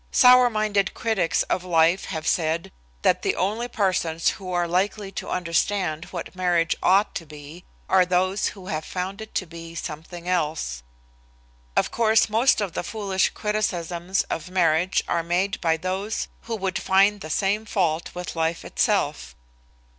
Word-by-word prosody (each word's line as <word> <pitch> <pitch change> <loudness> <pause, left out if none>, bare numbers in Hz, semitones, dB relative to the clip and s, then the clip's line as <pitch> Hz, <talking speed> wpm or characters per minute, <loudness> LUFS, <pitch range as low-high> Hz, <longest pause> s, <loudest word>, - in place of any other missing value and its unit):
Sour 250 0 +7
minded 215 -3 0
critics 210 -7 +1
of 180 - -2
life 170 +1 +3
have 160 -4 -5
said 165 -2 0 0.3
that - - +3
the - - 0
only 215 +6 -1
persons 185 -8 0
who 185 -2 -6
are 175 -1 +1
likely 195 +3 -1
to - - -6
understand 175 -1 0
what - - -7
marriage 175 -2 +1
ought 195 +3 +3
to - - -4
be 150 +3 -12 0.2
are 190 -1 +5
those 185 +2 +1
who 190 - -11
have 155 -5 -3
found 190 +5 -4
it 220 - -10
to 185 - 0
be 165 0 -10
something 170 +2 -7
else. 155 - -1 1.0
Of - - +2
course 220 -1 +3
most 225 +2 +3
of 195 -5 -2
the - - -2
foolish 195 -1 0
criticisms 185 -4 -1
of 165 +2 -5
marriage 175 0 +2
are 170 - +1
made 180 +4 -1
by 165 -2 +2
those 190 +5 -3 0.2
who 230 - -3
would 190 -3 -2
find 195 +1 +3
the 155 - -7
same 200 +6 0
fault 170 -6 0
with 180 -1 -5
life 165 +1 -1
itself. 60 0 0
185 Hz, 160 wpm, -24 LUFS, 165-200 Hz, 1.0 s, Sour